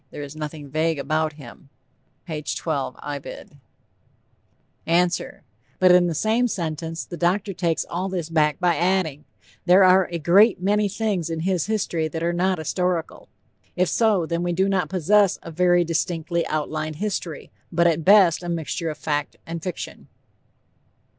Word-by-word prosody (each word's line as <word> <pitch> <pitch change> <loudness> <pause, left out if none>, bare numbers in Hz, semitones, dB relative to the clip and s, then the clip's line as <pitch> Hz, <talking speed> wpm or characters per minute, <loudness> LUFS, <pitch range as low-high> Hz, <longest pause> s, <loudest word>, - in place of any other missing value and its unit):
There 145 - -7
is 145 +1 -9
nothing 150 -1 -6
vague 155 +3 0
about 155 +2 -1
him." 140 -1 -14 0.6
(P. 155 -4 -5
12, 145 -4 -3
Ibid.) 145 0 -8 1.3
ANSWER: 175 +2 0 0.3
But 185 -1 +5
in 180 0 +5
the 165 - -2
same 225 +7 +1
sentence 165 -4 -4
the 175 - -8
doctor 190 +4 0
takes 170 -3 -1
all 185 +3 -3
this 180 -4 -3
back 155 -2 +1
by 175 -2 +2
adding: 175 -5 0 0.4
"There 185 +2 +7
are 185 0 +5
a 170 - -2
great 190 +7 +4
many 205 +2 +1
things 195 -5 -2
in 165 -1 -3
his 180 -1 0
history 180 -7 -1
that 160 +1 -5
are 170 +1 0
not 185 +2 +1
historical." 170 +1 -2 0.5
If 180 0 +1
so, 215 -7 +2
then 170 +1 -2
we 175 0 -1
do 190 +3 +1
not 195 -2 0
possess 195 +2 +3
"a 165 - -8
very 175 +1 +3
distinctly 165 0 -1
outlined 155 0 -3
history," 180 -4 -4 0.2
but 170 0 +2
at 165 -1 +2
best 190 -3 +5
a 175 - -6
mixture 165 0 -3
of 155 - -6
fact 150 -1 -2
and 165 0 -6
fiction. 180 +1 -6
170 Hz, 160 wpm, -23 LUFS, 155-185 Hz, 1.3 s, There